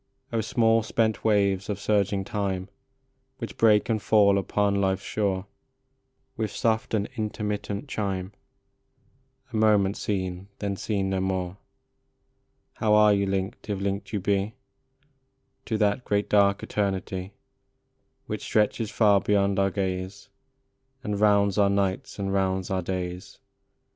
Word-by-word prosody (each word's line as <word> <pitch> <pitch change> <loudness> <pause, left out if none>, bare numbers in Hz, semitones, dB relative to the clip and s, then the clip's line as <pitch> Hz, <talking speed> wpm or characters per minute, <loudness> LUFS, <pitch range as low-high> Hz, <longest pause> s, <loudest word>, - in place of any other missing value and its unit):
8o 130 0 -48
ETERNITY. 115 - -3
O - - +2
small, 115 +1 +3
spent 110 0 0
waves 100 -3 +2
of 100 -1 -2
surging 100 -1 +1
time, 95 -2 -3 0.7
Which 115 - -6
break 105 -2 +4
and 110 -2 0
fall 100 -2 +4
upon 100 0 +1
life 95 -1 +2
s - - -13
shore 100 -3 -1 0.9
With 110 -2 -2
soft 110 -1 0
and 105 -1 0
intermittent 105 +2 -3
chime, 95 -6 -3 1.2
A - - -3
moment 105 -2 +3
seen, 95 -2 -3
then 100 -1 -2
seen 95 -1 -2
no 95 - 0
more, 95 -1 -2 1.2
How 105 -1 +3
are 105 -1 +6
you 100 -1 +1
linked, 95 +2 -3
if 100 -2 -1
linked 100 0 -3
you 105 - -1
be, 100 +3 0 1.1
To 110 - -1
that 105 +3 +1
great 105 -2 0
dark 100 -1 +3
eternity 95 -1 -2 0.9
Which - - -4
stretches 105 +1 +1
far 105 -3 +4
beyond 100 -1 +2
our 95 0 +3
gaze, 95 0 -4 0.7
And 105 -4 -2
rounds 100 -1 +3
our 100 -1 +5
nights 100 -1 -1
and 95 -1 -2
rounds 95 0 0
our 95 -1 0
days 90 0 -5
100 Hz, 140 wpm, -26 LUFS, 95-105 Hz, 1.2 s, are